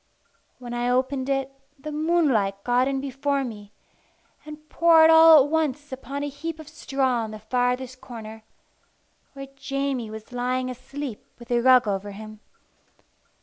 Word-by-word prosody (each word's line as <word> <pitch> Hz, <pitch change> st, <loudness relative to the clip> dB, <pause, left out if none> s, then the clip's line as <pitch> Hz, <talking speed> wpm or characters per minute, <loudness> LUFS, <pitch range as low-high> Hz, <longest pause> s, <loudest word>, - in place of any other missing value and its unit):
When 245 Hz, -1 st, -8 dB
I 240 Hz, 0 st, -1 dB
opened 260 Hz, +1 st, 0 dB
it, 270 Hz, 0 st, -1 dB, 0.3 s
the 300 Hz, +3 st, -7 dB
moonlight 295 Hz, -, +1 dB
got 245 Hz, +1 st, +2 dB
in 275 Hz, -1 st, -1 dB
before 275 Hz, +1 st, -2 dB
me, 210 Hz, -5 st, -8 dB, 0.7 s
and 305 Hz, 0 st, -11 dB
poured 325 Hz, 0 st, +5 dB
all 320 Hz, -3 st, +8 dB
at 290 Hz, -, -7 dB
once 295 Hz, -2 st, -1 dB
upon 275 Hz, +2 st, -6 dB
a -, -, -2 dB
heap 315 Hz, +3 st, -6 dB
of 315 Hz, -, -11 dB
straw 270 Hz, -5 st, -1 dB
in -, -, -8 dB
the 215 Hz, -, -8 dB
farthest 250 Hz, +3 st, -2 dB
corner, 220 Hz, -3 st, -9 dB, 0.9 s
where 275 Hz, -1 st, -9 dB
Jamie 275 Hz, -4 st, -3 dB
was 220 Hz, +2 st, -10 dB
lying 255 Hz, +1 st, -2 dB
asleep 255 Hz, -1 st, -7 dB
with 240 Hz, +1 st, -13 dB
a 240 Hz, 0 st, +2 dB
rug 255 Hz, -2 st, +5 dB
over 200 Hz, 0 st, -3 dB
him. 215 Hz, +1 st, -10 dB
260 Hz, 150 wpm, -24 LUFS, 240-285 Hz, 0.9 s, all